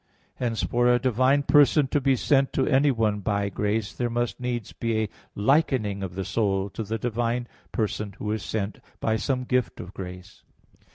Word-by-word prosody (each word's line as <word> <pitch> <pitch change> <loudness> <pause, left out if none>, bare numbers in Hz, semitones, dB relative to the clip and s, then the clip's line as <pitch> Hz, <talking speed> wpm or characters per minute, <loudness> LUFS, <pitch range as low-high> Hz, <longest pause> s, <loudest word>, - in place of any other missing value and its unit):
Hence 115 -3 -1
for 120 0 +2
a 120 - +5
divine 130 +3 +2
person 145 0 +5
to 145 - +1
be 135 0 +3
sent 135 +2 +2
to 135 - +2
anyone 115 -7 +2
by 100 0 0
grace, 105 +1 -1
there 120 -1 -1
must 120 0 -2
needs 120 -4 -3
be 115 -1 -1
a 105 - -3 0.3
likening 110 -4 +2
of 90 -2 -5
the 95 0 -3
soul 95 -1 0
to - - -5
the 110 +1 -2
divine 120 +1 -1 0.2
person 105 -3 -2
Who 105 - -3
is 110 -1 -1
sent, 100 +4 -3 0.2
by 110 - +1
some 130 +2 -1
gift 125 -2 0
of 90 +2 -8
grace. 90 -1 -9
115 Hz, 180 wpm, -26 LUFS, 105-125 Hz, 0.3 s, a